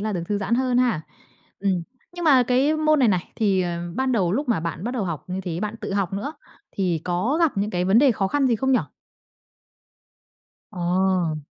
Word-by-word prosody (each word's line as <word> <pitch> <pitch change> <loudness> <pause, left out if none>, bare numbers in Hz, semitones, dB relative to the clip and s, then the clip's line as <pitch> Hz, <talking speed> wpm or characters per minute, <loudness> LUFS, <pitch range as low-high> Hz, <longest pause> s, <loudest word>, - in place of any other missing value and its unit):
là 215 +1 -2
được 175 -3 -2
thư 205 -1 0
giãn 205 +3 0
hơn 250 -1 +1
ha. 240 -10 +2 0.6
Ừm. 190 -3 0 0.3
Nhưng 350 -1 -5
mà 265 -5 +6
cái 265 +6 +2
môn 310 -1 +3
này 250 -4 +4
này, 185 -3 -1
thì, 195 -4 +2
à, 170 -1 -3
ban 260 -1 +1
đầu 185 -6 +1
lúc 275 +6 -1
mà 215 -9 +1
bạn 170 +3 -4
bắt 240 - -1
đầu 215 -5 -1
học 165 -5 -4
như 185 +1 -4
thế, 175 -2 -4
bạn 215 +1 -3
tự - - -4
học 195 -2 -1
nữa, 205 +10 -3 0.4
thì 180 -5 -1
có 185 - 0
gặp 330 -3 +3
những 205 +2 0
cái 180 -2 -1
vấn 195 +4 +4
đề 270 -1 +5
khó 195 -3 -1
khăn 285 +2 +1
gì 235 -3 +2
không 265 +3 +1
nhỉ? 250 - +5 1.9
Ờ. 180 -3 0
205 Hz, 220 wpm, -23 LUFS, 180-255 Hz, 1.9 s, mà